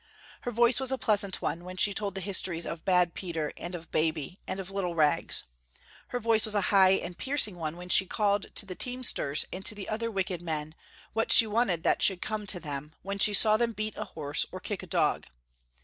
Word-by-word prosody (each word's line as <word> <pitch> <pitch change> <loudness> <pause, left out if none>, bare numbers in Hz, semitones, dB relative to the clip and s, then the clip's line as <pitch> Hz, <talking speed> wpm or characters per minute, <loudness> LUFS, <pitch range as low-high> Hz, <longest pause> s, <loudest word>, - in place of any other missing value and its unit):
Her - - -4
voice 240 +1 +3
was 265 -1 -1
a 265 - 0
pleasant 205 -5 0
one, 170 - -2
when 185 +1 -9
she 200 +2 +4
told 200 -2 -3
the 195 - -3
histories 180 -3 -1
of 165 -1 -6
bad 180 -3 +2
Peter 165 -5 -4
and 175 +1 -6
of 165 -1 -9
Baby 160 +2 -1
and 190 - -4
of 190 0 -7
little 185 -3 -3
Rags. 150 -3 +2 0.6
Her 245 - -3
voice 225 -1 +2
was 215 -1 +1
a - - +3
high 190 -1 +7
and 180 -2 -2
piercing 265 -4 +2
one 165 -1 -5
when 180 0 -9
she 190 - +4
called 205 0 0
to - - +1
the 190 - -7
teamsters 245 - 0
and 190 - -6
to 210 - +1
the 205 - -7
other 230 +2 -2
wicked 190 -4 -2
men, 155 -2 -4 0.4
what 225 +1 0
she 230 - +7
wanted 210 -6 0
that - - +1
should 190 -3 +4
come 215 0 -4
to 185 - +1
them, 150 -1 -7
when 200 +1 -4
she 205 +1 +6
saw 215 +1 +7
them 235 0 0
beat 215 0 -4
a - - -5
horse 145 -2 -1
or - - -7
kick - - -4
a - - -10
dog. - - 0
190 Hz, 225 wpm, -28 LUFS, 170-215 Hz, 0.6 s, high